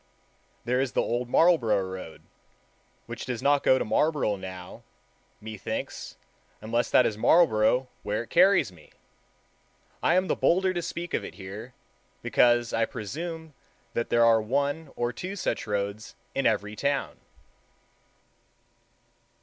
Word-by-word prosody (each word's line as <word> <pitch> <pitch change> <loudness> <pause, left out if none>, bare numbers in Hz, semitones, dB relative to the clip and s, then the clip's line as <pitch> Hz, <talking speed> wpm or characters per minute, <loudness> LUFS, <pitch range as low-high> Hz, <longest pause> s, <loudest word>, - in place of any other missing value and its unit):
There 125 +2 +1
is 135 -2 -2
the - - +2
Old 120 +1 -2
Marlborough 120 - +3
Road, 95 -3 -8 0.8
which - - -7
does 125 -3 -4
not 145 0 +4
go 130 - +4
to - - -1
Marlborough 145 -3 +1
now, 95 -2 -9 0.6
methinks, 110 -2 -6 0.4
unless 115 +2 -1
that 125 - +5
is 105 -1 -2
Marlborough 125 -5 +4
where 105 +2 -2
it - - -18
carries 185 - +4
me. 80 -4 -19 1.1
I 175 - +3
am 185 +1 +3
the - - 0
bolder 185 +2 +2
to 175 - -2
speak 170 0 -5
of - - 0
it - - -8
here, 105 +6 -9 0.5
because 120 -1 +3
I 115 0 +2
presume 160 - -6 0.4
that 115 - -2
there 120 0 +4
are 115 -1 +5
one 140 +6 -1
or 120 0 -1
two 185 - -6
such 185 - -2
roads 100 +1 -3 0.2
in 135 - +1
every 105 +1 -1
town. 140 +5 -2
120 Hz, 140 wpm, -27 LUFS, 105-150 Hz, 1.1 s, that